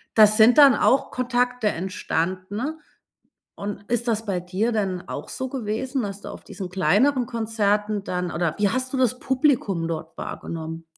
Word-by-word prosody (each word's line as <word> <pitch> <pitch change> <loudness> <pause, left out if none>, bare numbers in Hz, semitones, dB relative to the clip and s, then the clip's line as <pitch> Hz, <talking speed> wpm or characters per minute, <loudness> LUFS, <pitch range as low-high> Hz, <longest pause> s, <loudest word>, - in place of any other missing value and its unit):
da 215 -1 +9
sind 220 +4 +5
dann 285 -3 +9
auch 260 +5 +2
Kontakte 250 -2 0
entstanden. 190 - -3 0.8
Und 200 0 -6
ist 240 0 0
das 225 0 0
bei 195 -4 -1
dir 190 +6 -1
denn 190 -4 -2
auch - - -6
so 260 - -3
gewesen, 255 +2 -2
dass 200 -1 -5
du - - -9
auf - - -10
diesen 190 -3 -7
kleineren 235 +8 +2
Konzerten 215 -3 0
dann 180 -2 -3
oder 170 -2 -1
wie 205 -1 +2
hast 255 +4 -2
du - - 0
das 255 -1 +2
Publikum 250 - +1
dort 160 -1 -6
wahrgenommen? 165 0 -6
210 Hz, 165 wpm, -24 LUFS, 185-250 Hz, 0.8 s, da